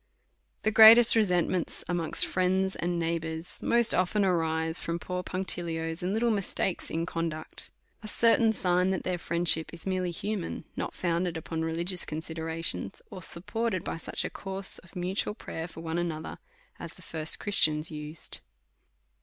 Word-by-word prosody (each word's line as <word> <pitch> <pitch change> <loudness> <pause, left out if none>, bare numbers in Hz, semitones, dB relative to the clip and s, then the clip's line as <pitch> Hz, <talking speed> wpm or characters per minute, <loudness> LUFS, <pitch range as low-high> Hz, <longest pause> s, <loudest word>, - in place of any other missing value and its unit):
The 215 - +2
greatest 225 +2 +9
resentments 180 -4 +1
amongst 170 -2 +1
friends 190 +1 +1
and 175 0 -2
neighbours 165 0 -3
most 235 -1 +3
often 195 +3 +2
arise 160 -2 0
from 170 0 -3
poor 180 +1 -4
punctilios 170 -3 -2
and 180 +2 -1
little 230 +3 +1
mistakes 195 -3 -1
in 165 +1 -2
conduct. 165 -2 -4 0.3
A 215 - -8
certain 230 +1 +4
sign 180 -3 +1
that 190 -2 -1
their 180 -1 -2
friendship 170 -1 +2
is 170 - -8
merely 185 -2 -1
human, 195 +2 -4
not - - -4
founded 175 -1 -1
upon 160 0 -4
religi 165 +3 -2
ous 180 - -2
considerations, 160 - -4
or 185 - -8
supported 190 +3 -1
by - - -4
such - - -2
a - - -4
course 195 0 -2
of 185 - -18
mutual 185 +3 -2
prayer 165 -6 -6
for 165 - -10
one 165 +1 -2
another, 160 -2 -4 0.4
as - - -7
the - - -14
first 160 -1 -2
Christians 155 -6 +2
used. 150 +1 -3
175 Hz, 155 wpm, -28 LUFS, 165-190 Hz, 0.4 s, greatest